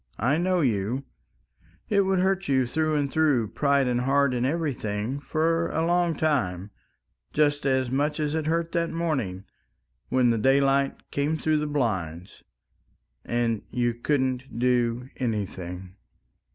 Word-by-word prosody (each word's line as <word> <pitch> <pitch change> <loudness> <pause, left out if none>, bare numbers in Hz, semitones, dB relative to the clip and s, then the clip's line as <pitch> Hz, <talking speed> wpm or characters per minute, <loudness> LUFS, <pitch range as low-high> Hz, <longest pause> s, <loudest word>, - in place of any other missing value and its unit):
I 130 +8 +1
know 180 0 +1
you... 120 0 0 0.8
it 200 -1 +3
would 190 -1 +1
hurt 190 +1 +1
you 130 -2 +2
through 155 +5 0
and 140 -2 0
through, 145 -9 +2
pride 140 -2 +2
and 125 0 +1
heart 140 0 +2
and 125 +1 0
everything, 130 -10 -2
and 140 +5 -4
for 165 +1 0
a 160 +1 0
long 175 -1 +2
time 105 - -1 0.6
just 145 -1 +2
as 130 -2 +1
much 145 +3 0
as 150 -1 -1
it 160 -1 -1
hurt 165 +1 0
that 170 -1 0
morning 135 - -2 0.7
when 125 -2 +3
the 115 - 0
daylight 135 +2 +2
came 145 +3 0
through 155 0 +1
the 150 0 -1
blinds. 95 - -3 0.8
And 115 -2 0
you 120 -1 0
couldn't 130 0 -1
do 125 0 +1
anything! 95 -6 -4
135 Hz, 145 wpm, -26 LUFS, 120-155 Hz, 0.8 s, it